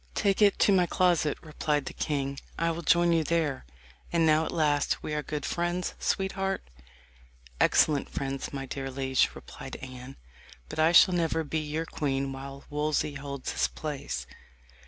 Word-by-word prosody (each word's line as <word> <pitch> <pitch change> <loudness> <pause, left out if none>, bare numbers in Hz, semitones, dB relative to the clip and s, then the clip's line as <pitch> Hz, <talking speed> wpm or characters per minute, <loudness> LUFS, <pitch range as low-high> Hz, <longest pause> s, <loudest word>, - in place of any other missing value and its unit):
"Take 200 0 +1
it 205 -1 +5
to - - +4
my 180 -3 +4
closet," 175 -5 +2
replied 150 -2 -1
the - - -6
king; 140 -2 -2 0.2
"I 165 0 +1
will 165 +1 -4
join 170 +1 +4
you 165 -1 +3
there. 155 - -1 0.4
And 170 -1 +3
now 155 0 +4
at - - -4
last 145 -3 +1
we 150 - -3
are 150 - 0
good 150 0 -4
friends, 175 +1 -1
sweetheart." 195 - -1 0.9
"Excellent 145 -3 +3
friends, 135 -1 -4
my 135 -1 -4
dear 135 0 -5
liege," 130 0 +1
replied - - -9
Anne; 130 0 -9 0.5
"but - - -6
I 160 +1 +5
shall 180 +1 +7
never 165 -2 +1
be 160 +1 -2
your 155 +2 -3
queen 135 -3 -2
while 135 +1 -8
Wolsey 150 0 0
holds 140 -1 -5
his - - +1
place." 150 -3 -5
150 Hz, 165 wpm, -28 LUFS, 140-170 Hz, 0.9 s, shall